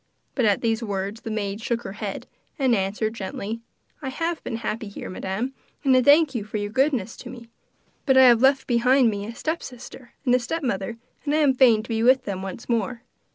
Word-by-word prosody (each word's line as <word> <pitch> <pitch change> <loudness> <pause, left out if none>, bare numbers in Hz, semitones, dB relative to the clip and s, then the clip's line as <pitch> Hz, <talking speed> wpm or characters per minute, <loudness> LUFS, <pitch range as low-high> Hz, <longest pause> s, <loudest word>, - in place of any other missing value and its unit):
But 255 - +1
at 205 -2 +2
these 225 -1 0
words 200 0 -3
the - - -6
maid 210 -1 -3
shook 235 +1 -2
her - - -6
head, 205 -1 -5 0.3
and 265 -3 +2
answered 210 +2 0
gently: 215 +1 -5 0.4
'I 265 - -3
have 330 +4 -3
been 230 - -4
happy 225 0 -4
here, 200 - -7
Madam, 195 +8 -3 0.3
and 265 -2 +4
I 255 - +5
thank 290 +3 +5
you 235 -5 -2
for 215 +1 -5
your 205 0 -3
goodness 260 -4 +1
to 245 - -9
me; 235 -2 -11 0.6
but 265 -1 +5
I 260 - +9
have 240 -2 +6
left 270 +1 +4
behind 250 0 +4
me 205 0 -4
a 230 - -7
stepsister 255 -5 -6
and 245 - +3
a 250 - +5
stepmother, 240 -6 -3 0.3
and 295 0 0
I - - +3
am 290 -4 +4
fain 240 -5 +5
to - - -12
be 225 -1 0
with 255 +3 +5
them 190 -2 -3
once 195 +3 -7
more. 235 +1 -1
235 Hz, 215 wpm, -24 LUFS, 210-260 Hz, 0.6 s, I